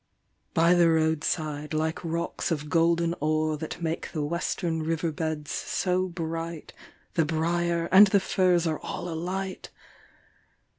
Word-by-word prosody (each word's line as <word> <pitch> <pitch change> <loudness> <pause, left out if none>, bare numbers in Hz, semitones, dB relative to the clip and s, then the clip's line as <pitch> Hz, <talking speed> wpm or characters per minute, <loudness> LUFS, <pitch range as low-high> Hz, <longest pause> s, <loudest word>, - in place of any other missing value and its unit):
By 170 +1 +5
the 175 -1 +5
roadside, 155 -1 0
like 160 +2 -1
rocks 170 +2 -2
of 150 -3 -2
golden 170 +1 +3
ore 155 +1 +1
That 160 +3 -6
make 165 0 -3
the 155 -3 -1
western 170 +1 -2
river 165 +1 -1
beds 155 -1 -3
so 185 0 0
bright, 165 -2 -5 0.4
The 165 - +3
briar 170 +1 0
and 200 +2 +9
the 200 +1 +3
furze 180 -2 +2
are 160 -2 -1
all - - -5
alight! 185 +3 -4
165 Hz, 135 wpm, -27 LUFS, 155-175 Hz, 0.4 s, and